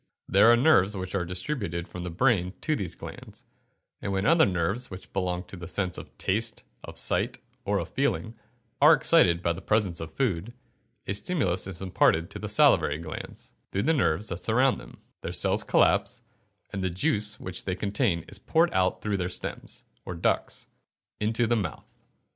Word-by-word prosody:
There 100 +4 +6
are 120 - +6
nerves 105 - +4
which 95 0 -5
are 100 -2 0
distributed 90 - -3
from 90 - -8
the 90 - -4
brain 95 -1 +1
to 155 - +1
these 95 - -3
glands, - - -10 0.6
and 100 - -3
when 95 0 0
other 165 -3 +5
nerves 95 +7 -1
which 95 0 -10
belong 90 -2 -1
to 95 - -11
the 85 -2 -8
senses 90 0 -2
of - - -13
taste, 110 +3 -1 0.2
of - - -8
sight, - - 0 0.3
or - - +1
of - - -3
feeling, 95 +8 -1 0.5
are 150 +3 +9
excited 90 - +4
by 85 - +2
the 90 - -8
presence 105 -5 +1
of 80 -1 -7
food, 115 -3 -1 0.5
a 100 - -2
stimulus 100 - 0
is 95 0 -7
imparted 85 -2 +2
to - - -6
the - - -5
salivary 70 - +4
glands, 80 -1 -8 0.2
through 100 - 0
the 160 - +3
nerves 105 - +1
that 90 0 -5
surround 125 +4 +3
them, - - -14 0.2
their - - -4
cells - - +2
collapse, - - +2 0.5
and 100 -1 -3
the 95 - +1
juice 105 +4 0
which 90 -1 -4
they 95 - -1
contain 100 -4 0
is 105 - -5
poured 165 - +2
out 95 0 +1
through 105 -2 0
their 90 -1 -2
stems, - - -5 0.2
or 90 - -6
ducts, 85 - -1 0.5
into 110 +3 +1
the 120 +1 +2
mouth. 105 -5 -3
95 Hz, 185 wpm, -27 LUFS, 90-115 Hz, 0.6 s, are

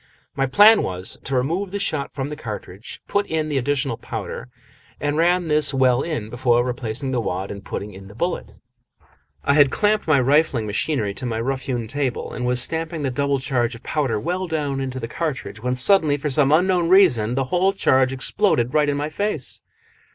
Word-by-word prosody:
My 135 0 0
plan 210 +10 +6
was 90 0 -4
to 135 - -2
remove 165 +10 -1
the 200 - -4
shot 155 -8 -3
from 135 -1 -4
the 150 - -5
cartridge, 105 - -8
put 205 0 0
in 155 -1 -2
the 140 -2 0
additional 135 -2 -1
powder, 60 - -6 0.5
and 145 0 -1
ram 175 +2 +2
this 150 -2 +2
well 130 -1 +3
in 120 -10 -4
before 120 -1 +2
replacing 125 +1 -3
the 125 -2 0
wad 95 -2 -3
and 100 -1 -8
putting 105 0 -6
in 95 +1 -11
the 100 - -14
bullet. 175 +8 -3 0.9
I 140 - +2
had 145 -2 +5
clamped 210 +5 +1
my 155 -2 +4
refilling 135 -3 +2
machine 105 0 -1
to 125 - -7
my 115 -1 -2
rough 130 +3 -2
hewn 120 -4 -2
table, 135 -1 -3
and 125 - -3
was 125 0 +2
stamping 160 0 -2
the 135 - -1
double 140 +2 0
charge 125 -2 -1
of 115 - -14
powder 135 -8 -1
well 180 - -2
down 145 -4 -2
into 130 -1 -4
the 115 - -5
cartridge, 130 -8 -4
when 125 +1 -1
suddenly, 150 +2 +4
for 145 +1 -3
some 140 0 +3
unknown 175 +1 +3
reason, 125 - +4
the 135 - +1
whole 185 +2 +3
charge 130 -9 +2
exploded 130 - 0
right 150 -1 +3
into 140 - 0
my 145 +1 -2
face. 160 -4 -2
135 Hz, 200 wpm, -22 LUFS, 120-160 Hz, 0.9 s, plan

